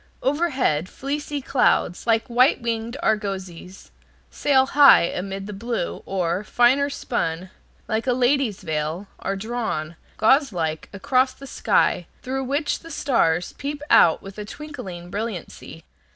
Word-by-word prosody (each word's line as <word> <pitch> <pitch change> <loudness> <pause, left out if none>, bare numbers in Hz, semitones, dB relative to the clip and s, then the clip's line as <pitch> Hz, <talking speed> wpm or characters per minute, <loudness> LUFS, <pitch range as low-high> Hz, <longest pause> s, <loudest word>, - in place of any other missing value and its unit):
Overhead 265 - +1
fleecy 290 +1 -4
clouds, 245 -7 +1
like 225 0 +3
white 250 +4 +3
winged 235 +1 -3
argosies, 190 -4 -3 0.4
sail 265 -2 +3
high 280 -5 +7
amid 195 +3 -4
the 210 - -7
blue, 225 -2 -3
or, 180 0 -1
finer 250 +6 +3
spun, 185 -9 -3 0.4
like 220 +3 -2
a 250 - +3
lady's 250 -4 +1
veil, 155 +3 -3
are 195 - -2
drawn, 195 -7 -3 0.2
gauzelike, 210 - +1
across 255 +6 +1
the 275 - -11
sky, 195 -8 +1 0.2
through 265 +1 -3
which 285 +3 -1
the 330 - -13
stars 180 - +1
peep 290 +1 -4
out 165 - +5
with 195 +2 -8
twinkling 200 - -8
brilliancy. 200 -6 -6
225 Hz, 125 wpm, -23 LUFS, 185-265 Hz, 0.4 s, high